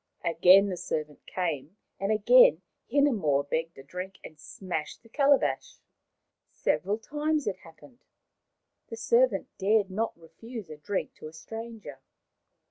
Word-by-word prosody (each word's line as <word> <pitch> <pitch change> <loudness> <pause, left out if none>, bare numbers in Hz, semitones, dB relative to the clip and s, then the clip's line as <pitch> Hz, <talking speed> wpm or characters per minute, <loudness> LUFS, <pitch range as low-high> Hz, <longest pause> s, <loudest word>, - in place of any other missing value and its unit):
Again 180 +4 +6
the 180 - -4
servant 155 -4 -5
came, 165 0 -3 0.2
and 195 +2 -1
again - - +6 0.3
Hinemoa 190 - +2
begged 165 +3 -2
a 135 - -11
drink 180 +6 -7
and 155 - -12
smashed 165 +2 -6
the 230 - -19
calabash. 285 - +1 0.7
Several 200 +3 -1
times 300 +5 -2
it 195 -3 -2
happened. 190 - -18 0.8
The 225 - -8
servant 235 -2 +2
dared 200 0 +2
not 220 -2 -2
refuse 215 +3 -10
a 155 - -8
drink 185 +6 -3
to - - -9
a 155 - -12
stranger. 220 - -9
195 Hz, 130 wpm, -28 LUFS, 165-230 Hz, 0.8 s, Again